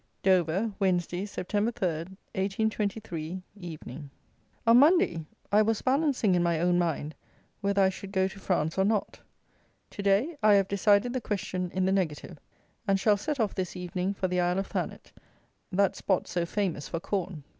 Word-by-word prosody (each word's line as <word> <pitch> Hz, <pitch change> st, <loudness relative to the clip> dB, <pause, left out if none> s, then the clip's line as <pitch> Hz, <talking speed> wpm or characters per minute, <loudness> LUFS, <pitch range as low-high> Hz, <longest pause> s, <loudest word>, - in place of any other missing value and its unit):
Dover, 190 Hz, +3 st, +2 dB
Wednesday, 185 Hz, 0 st, 0 dB
Sept. 185 Hz, -, -7 dB
3, 205 Hz, -, +2 dB
1823 190 Hz, -1 st, -2 dB
(Evening). 155 Hz, -, -8 dB, 0.6 s
On 230 Hz, +1 st, +7 dB
Monday 275 Hz, -, +4 dB, 0.2 s
I 210 Hz, +1 st, +6 dB
was 220 Hz, 0 st, 0 dB
balancing 270 Hz, -, +2 dB
in 175 Hz, -, +3 dB
my 170 Hz, -2 st, +1 dB
own 175 Hz, +1 st, +3 dB
mind 160 Hz, -3 st, -1 dB, 0.5 s
whether 200 Hz, -1 st, +2 dB
I 190 Hz, -, +5 dB
should 190 Hz, +1 st, -8 dB
go 190 Hz, -1 st, +2 dB
to 195 Hz, -, -10 dB
France 175 Hz, -3 st, 0 dB
or -, -, +5 dB
not. 210 Hz, 0 st, 0 dB, 0.7 s
To -, -, -6 dB
day 205 Hz, +11 st, +2 dB
I 210 Hz, -1 st, +6 dB
have 195 Hz, -1 st, +3 dB
decided 205 Hz, +4 st, +3 dB
the 255 Hz, -, -2 dB
question 185 Hz, -4 st, -3 dB
in 185 Hz, 0 st, 0 dB
the 190 Hz, -, +2 dB
negative, 175 Hz, -3 st, -2 dB, 0.5 s
and 195 Hz, -1 st, +3 dB
shall 210 Hz, +1 st, +4 dB
set 285 Hz, +7 st, -3 dB
off 220 Hz, -3 st, +1 dB
this 185 Hz, -2 st, -3 dB
evening 180 Hz, +2 st, -3 dB
for 190 Hz, -, -1 dB
the 180 Hz, 0 st, 0 dB
Isle 175 Hz, +1 st, +1 dB
of 195 Hz, -, 0 dB
Thanet, -, -, -5 dB, 0.6 s
that 200 Hz, +1 st, +2 dB
spot 190 Hz, -3 st, 0 dB
so 175 Hz, -1 st, -1 dB
famous 180 Hz, -7 st, -2 dB
for 165 Hz, -, -3 dB
corn. 185 Hz, -4 st, -3 dB
190 Hz, 170 wpm, -28 LUFS, 175-205 Hz, 0.7 s, On